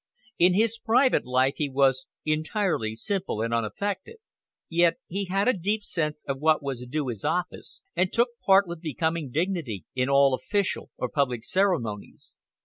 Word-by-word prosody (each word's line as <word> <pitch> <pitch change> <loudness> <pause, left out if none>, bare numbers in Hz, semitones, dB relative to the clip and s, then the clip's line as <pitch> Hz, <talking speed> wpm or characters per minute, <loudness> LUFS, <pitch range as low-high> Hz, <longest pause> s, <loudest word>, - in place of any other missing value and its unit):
In 180 +1 +5
his 225 +2 +2
private 240 - +3
life 130 +2 +2
he 150 -2 -1
was 135 -1 +2 0.2
entirely 155 - 0
simple 190 - -2
and 115 0 -2
unaffected. 190 - -2 0.5
Yet 170 0 +3
he 195 +3 -3
had 195 +4 0
a 255 - +5
deep 205 +4 -1
sense 150 -5 -3
of 135 -1 -2
what 155 0 +3
was 135 -3 -4
due 145 -1 -2
his 110 -5 -6
office, 180 0 -3
and 185 0 +1
took 235 +1 +3
part 195 +1 +6
with 170 -1 -7
becoming 160 -1 -2
dignity 155 - -2
in 130 +1 0
all 140 -1 +5
official 200 +9 -1
or 125 - -2
public 125 -4 -1
ceremonies. 165 - -1
160 Hz, 160 wpm, -26 LUFS, 130-195 Hz, 0.5 s, part